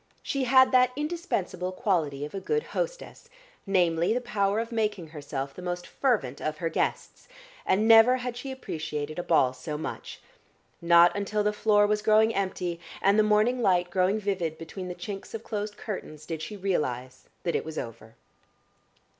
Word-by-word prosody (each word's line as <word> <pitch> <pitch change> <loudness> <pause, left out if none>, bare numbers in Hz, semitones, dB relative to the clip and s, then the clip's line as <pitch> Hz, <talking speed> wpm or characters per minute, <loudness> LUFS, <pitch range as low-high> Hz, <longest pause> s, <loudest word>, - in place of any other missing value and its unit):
She 275 -2 -1
had 260 +1 +6
that 255 -1 +5
indispensable 295 - -3
quality 160 - -1
of 150 - -10
a 195 - -3
good 450 - -1
hostess, - - -5 0.4
namely, 175 0 +2
the - - +1
power 210 -4 0
of 230 +1 -4
making 210 -7 -1
herself 140 -3 -5
the - - -10
most 175 0 -4
fervent 200 - -1
of 155 0 -2
her 165 +1 -2
guests, - - -3 0.4
and 210 +4 +3
never 225 +3 +7
had 250 -1 -4
she 265 +2 -6
appreciated 155 - -5
a - - -2
ball 130 -7 +3
so 150 +4 -5
much. 155 - -6 0.6
Not 170 0 +6
until 205 +1 -1
the 210 0 +1
floor 210 -1 +3
was 210 0 +1
growing 220 +1 +4
empty 185 -3 -2 0.2
and 200 +2 +3
the - - +8
morning 215 +4 +2
light 180 -4 +2
growing 190 +3 +2
vivid 180 -6 -2
between 180 +3 -7
the 180 - -5
chinks 195 +4 -7
of 225 - -6
closed 210 -1 -4
curtains 155 -8 -7
did 160 -1 -5
she 210 +5 -6
realise 130 -10 -2 0.2
that 170 - -1
it - - 0
was 160 0 -7
over. 115 -1 -7
195 Hz, 175 wpm, -27 LUFS, 165-220 Hz, 0.6 s, the